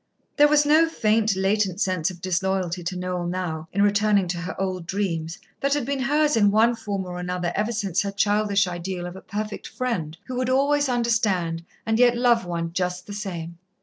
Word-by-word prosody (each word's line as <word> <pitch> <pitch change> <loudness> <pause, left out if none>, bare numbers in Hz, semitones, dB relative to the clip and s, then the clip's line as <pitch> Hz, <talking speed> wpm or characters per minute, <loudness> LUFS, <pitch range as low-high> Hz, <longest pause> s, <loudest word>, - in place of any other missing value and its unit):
There 295 0 +7
was 295 0 +4
no 315 +3 +5
faint, 220 -6 +2
latent 195 0 +1
sense 185 -5 +1
of 180 -2 -10
disloyalty 185 -1 -1
to 185 +1 -3
Noel 180 -1 -3
now, 175 -3 -3
in 200 +1 +2
returning 205 -1 +3
to 175 -1 -2
her 180 +2 -6
old 185 -3 -3
dreams, 170 -4 -2 0.2
that 280 +1 +1
had 290 -5 -1
been 280 +1 -2
hers 295 +3 +2
in 205 -2 +4
one 220 +3 +4
form 205 -4 -4
or 180 0 -6
another 180 -1 -2
ever 210 +3 0
since 200 -5 0
her 200 - -2
childish 205 -1 +2
ideal 175 0 -4
of 175 +1 -7
a 190 - -9
perfect 210 +1 -5
friend 180 -12 -3
who 255 -1 -5
would 255 0 0
always 285 +2 +2
understand, 215 -9 0 0.2
and 225 +1 +1
yet 245 -1 +5
love 240 -4 +3
one 170 -1 -3
just 180 0 -2
the 205 - -8
same. 170 -5 -6
195 Hz, 200 wpm, -24 LUFS, 180-230 Hz, 0.2 s, There